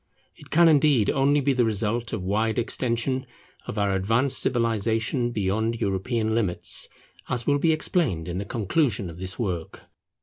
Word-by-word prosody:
It 145 - -16
can 170 +2 +5
indeed 145 -7 +4
only 145 +1 +2
be 140 0 +2
the 125 -1 +2
result 115 +2 -1
of 105 -5 -3
wide 110 +4 0
extension 125 +2 -1 0.4
of - - -5
our 100 -1 +1
advanced 115 +8 +1
civilization 115 +1 0
beyond 110 +1 -1
European 110 +2 -1
limits, 105 -6 -1 0.4
as 120 -1 -2
will 145 -1 +2
be 165 +2 +3
explained 155 - 0
in 90 +1 -3
the 100 - -4
conclusion 110 - 0
of 85 - -12
this 95 0 -3
work. 90 -8 -4
115 Hz, 160 wpm, -25 LUFS, 100-130 Hz, 0.4 s, can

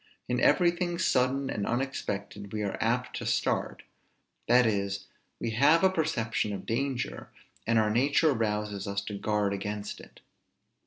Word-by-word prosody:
In 125 0 0
everything 175 +2 +3
sudden 135 -5 +1
and 100 - -2
unexpected, 105 -6 -3
we 105 -1 -2
are 100 - -2
apt - - 0
to - - -5
start; - - 0 0.6
that 125 +1 +5
is, 100 -2 -1 0.3
we 115 - -2
have 145 +9 +4
a 190 - +5
perception 115 - -1
of 100 - -6
danger, 130 +2 -2 0.4
and 115 0 +3
our 110 -1 +3
nature 140 +6 +3
rouses 105 -3 -2
us 100 0 -1
to 105 - -6
guard 105 0 0
against 105 +1 -4
it. - - -15
110 Hz, 150 wpm, -29 LUFS, 105-135 Hz, 0.6 s, that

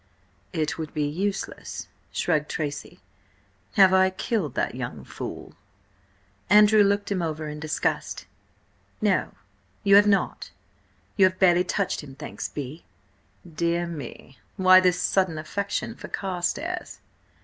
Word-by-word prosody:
"It 160 -2 -2
would 155 -1 -6
be 150 - +1
useless," 195 +7 -4 0.2
shrugged 155 -3 0
Tracy. 145 -2 -4 0.7
"Have 190 -2 +6
I 190 0 +5
killed 190 -3 -2
that - - 0
young 120 - -6
fool?" - - -7 1.0
Andrew 210 +1 +7
looked 200 0 +2
him 190 -3 0
over 155 -2 -3
in 150 0 -6
disgust. 155 0 -2 0.7
"No, - - +1 0.5
you 200 0 +6
have 205 +1 +6
not. 200 -1 +1 0.7
You 195 - +7
have 185 0 +1
barely 180 -2 +5
touched 180 - -1
him, 135 -2 -11
thanks 150 +2 -6
be." 145 +3 -7 0.6
"Dear 170 +1 -1
me! 140 -6 -9 0.2
Why 185 0 +7
this 180 -1 +2
sudden 185 -4 +1
affection 200 +8 -3
for - - -10
Carstares?" 195 - -3
175 Hz, 125 wpm, -25 LUFS, 155-195 Hz, 1.0 s, Andrew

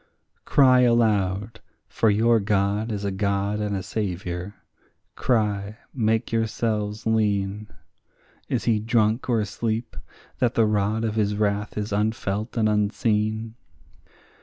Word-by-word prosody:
Cry 130 -3 +5
aloud; 110 -3 +2 0.3
for 110 - +1
your 115 +3 +3
God 100 +2 0
is 100 -1 -3
a 100 - -1
God 100 +1 -1
and 105 -1 -1
a 95 - -3
Saviour; 95 -1 -4 0.6
cry, 105 -3 0 0.2
make 110 -3 0
yourselves 110 -1 -1
lean; 105 -2 0 0.8
Is - - -1
he 115 -3 +2
drunk 110 +2 +1
or 115 -2 +3
asleep, 110 +3 -3 0.4
that 125 -1 +1
the 115 - +4
rod 105 +1 0
of 110 - -1
his 105 -1 0
wrath 105 0 -1
is 105 0 -3
unfelt 105 +1 -2
and 110 -1 +3
unseen? 110 +1 0
105 Hz, 125 wpm, -24 LUFS, 100-110 Hz, 0.8 s, Cry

